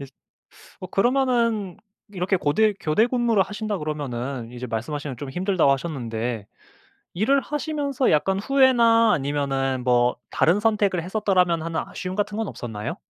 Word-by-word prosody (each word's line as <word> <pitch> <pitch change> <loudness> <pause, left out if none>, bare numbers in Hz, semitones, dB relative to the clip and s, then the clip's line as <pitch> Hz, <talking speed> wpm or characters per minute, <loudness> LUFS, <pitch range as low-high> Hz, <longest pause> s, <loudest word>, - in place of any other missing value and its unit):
잇 140 - -8 0.7
어 185 - -6
그러면은 235 -3 +1 0.4
이렇게 190 +1 0
고대 210 +8 +2
교대 185 +10 +2
근무를 240 -5 +2
하신다 205 0 -4
그러면은 135 -5 -4
이제 125 +1 -6
말씀하시며 130 +4 -4
좀 140 +2 -7
힘들다고 180 -3 +1
하셨는데 120 -7 -3 0.7
일을 230 +10 +2
하시면서 290 -2 -1
약간 190 +6 +2
후회나 235 -2 +4
아니면은 135 -2 -1
뭐 125 0 +3
'다른 180 +6 +2
선택을 205 -5 +1
했었더라면.' 180 -3 +1
하는 165 -1 -2
아쉬움 185 0 -6
같은 205 +1 -2
건 225 - -2
없었나요? 110 -3 -6
180 Hz, 355 characters per minute, -23 LUFS, 140-220 Hz, 0.7 s, 후회나